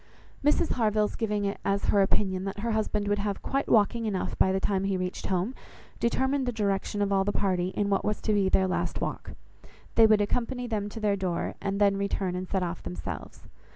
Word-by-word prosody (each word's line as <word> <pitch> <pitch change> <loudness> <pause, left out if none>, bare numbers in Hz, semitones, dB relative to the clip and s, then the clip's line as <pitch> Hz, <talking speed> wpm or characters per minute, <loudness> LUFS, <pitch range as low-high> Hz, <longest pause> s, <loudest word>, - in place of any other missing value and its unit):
Mrs 295 +3 +3
Harville's 215 -3 +1
giving 210 -2 -1
it 200 - -2
as 200 0 0
her 200 - +5
opinion 190 -1 +1
that 200 +1 -4
her 230 +1 -1
husband 210 -1 0
would 205 0 +1
have 200 -1 -2
quite 275 +1 -1
walking 225 +1 +3
enough 195 -3 -2
by 190 - +4
the 190 - +1
time 195 0 0
he 195 -1 0
reached 185 0 -3
home, 190 +6 0 0.5
determined 265 +3 +1
the - - +1
direction 205 -2 -1
of 200 - -1
all 195 0 +3
the 205 - 0
party 185 -3 0
in 205 - +1
what 195 - +2
was 210 0 -1
to 215 - +1
be 200 -2 +3
their 190 0 +3
last 185 - -1
walk; - - -4 0.6
they 225 -1 +7
would 215 -1 +5
accompany 245 +4 -1
them 210 -3 -2
to 225 - -7
their 210 -2 +2
door, 185 -3 -2
and 200 0 -2
then 200 -1 +4
return 195 -2 -1
and 185 0 -4
set 190 -2 0
off 170 -1 -4
themselves. 90 -3 -7
205 Hz, 220 wpm, -28 LUFS, 190-215 Hz, 0.6 s, they